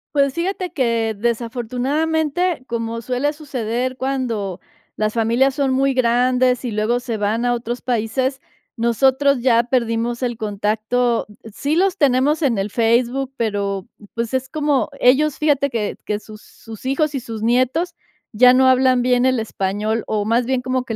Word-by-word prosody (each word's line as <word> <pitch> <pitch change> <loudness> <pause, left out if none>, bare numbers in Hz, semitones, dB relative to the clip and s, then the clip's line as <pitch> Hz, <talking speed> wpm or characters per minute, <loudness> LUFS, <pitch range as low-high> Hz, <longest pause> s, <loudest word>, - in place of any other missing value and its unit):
Pues, 280 -2 +3
fíjate 365 +2 -3
que, 230 -5 0
desafortunadamente, 260 - -1
como 230 -1 -3
suele 255 +4 0
suceder 255 -4 -3
cuando 245 -8 -2 0.4
las 215 0 -1
familias 235 +4 +2
son 275 -1 0
muy 270 +1 +2
grandes 250 +1 +2
y 240 - -2
luego 215 +3 0
se 240 -3 -4
van 215 +3 0
a 245 - +2
otros 240 +1 -4
países, 255 +3 -1 0.3
nosotros 265 +4 +2
ya 235 -2 +4
perdimos 235 0 -1
el 240 -1 -1
contacto. 220 +3 -1 0.3
Sí 285 +7 -1
los 380 +2 +2
tenemos 285 +1 +2
en 260 -8 +1
el 195 +1 -2
Facebook, 240 +4 +1
pero, 200 -4 -2 0.3
pues, 230 0 -3
es 260 0 -1
como 300 -2 0
ellos, 275 +4 +3
fíjate 290 -2 +2
que 225 -5 -2
que 210 0 -2
sus 215 0 -13
sus 225 +2 -13
hijos 295 +2 0
y 275 - -1
sus 225 -3 -7
nietos 255 +9 +1 0.4
ya 250 +3 +6
no 260 +1 +4
hablan 255 -1 +4
bien 250 0 +3
el 255 -2 +2
español, 215 +1 -2
o 210 -1 -1
más 230 +2 +1
bien 260 -1 0
como 255 0 -1
que 225 - -4
245 Hz, 160 wpm, -20 LUFS, 225-265 Hz, 0.4 s, ya